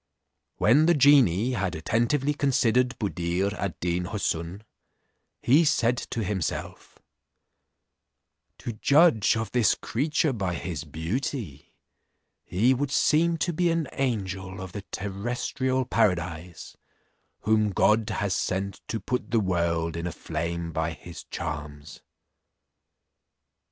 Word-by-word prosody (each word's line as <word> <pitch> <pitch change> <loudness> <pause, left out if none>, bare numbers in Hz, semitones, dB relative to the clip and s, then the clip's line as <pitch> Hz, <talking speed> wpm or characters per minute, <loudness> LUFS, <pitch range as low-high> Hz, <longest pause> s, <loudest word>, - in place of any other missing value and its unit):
When 145 +9 +4
the 170 - +5
genie 130 - +5
had 100 -8 -2
attentively 120 - +1
considered 125 -3 +2
Buddir 95 -1 -1
ad 100 -4 -4
Deen 90 0 -1
Houssun, 90 -1 -3 0.8
he 145 +7 +5
said 125 -6 +2
to 115 -1 -4
himself, 95 -4 -4 1.6
"To 120 - -5
judge 130 - +4
of 110 0 -3
this 120 -3 +3
creature 150 +3 0
by 95 -6 -2
his 85 -3 -5
beauty, 80 - -4 0.7
he 110 +9 +2
would 140 +2 -1
seem 165 +4 +3
to 175 - -2
be 175 +2 +1
an 165 -3 0
angel 95 -7 -3
of 95 -1 -7
the 100 - -6
terrestrial 120 +6 -2
paradise, 85 -5 -1 0.7
whom 110 0 +2
God 105 +3 +2
has 100 -2 -1
sent 95 +1 -2
to 115 - -3
put 125 +2 -3
the 115 - +2
world 85 -4 0
in 85 +1 -3
a - - -3
flame 85 +1 -4
by 80 +1 -2
his 85 +2 -11
charms." 75 0 -6
105 Hz, 120 wpm, -26 LUFS, 85-130 Hz, 1.6 s, the